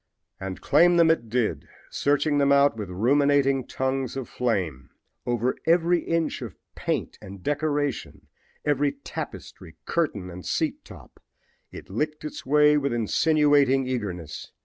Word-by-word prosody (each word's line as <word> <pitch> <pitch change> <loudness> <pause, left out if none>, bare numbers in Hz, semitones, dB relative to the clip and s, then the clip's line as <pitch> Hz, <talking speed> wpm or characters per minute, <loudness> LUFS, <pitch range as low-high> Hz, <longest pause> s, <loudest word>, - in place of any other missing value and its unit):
And 95 -1 -6
claim 175 +4 +4
them 165 -1 +6
it 120 -8 -1
did, 120 -1 -1 0.2
searching 145 +1 +1
them 140 0 +3
out 140 -2 +4
with 105 -4 -6
ruminating 135 +5 +2
tongues 130 0 -2
of 130 - -4
flame. 90 - -2 0.4
Over 120 +1 0
every 170 +1 +3
inch 165 -1 -1
of - - -7 0.2
paint - - -3
and 95 -1 -11
decoration, 145 -1 -2 0.4
every 145 -1 +1
tapestry, 135 - -8
curtain 105 - -1
and 90 +1 -9
seat - - -2
top - - -15 0.5
it - - -10
licked 150 +10 -3
its 150 - -7
way 150 +1 +5
with 140 -2 -1
insinuating 140 +2 +3
eagerness. 95 -11 -5
140 Hz, 135 wpm, -25 LUFS, 115-150 Hz, 0.5 s, them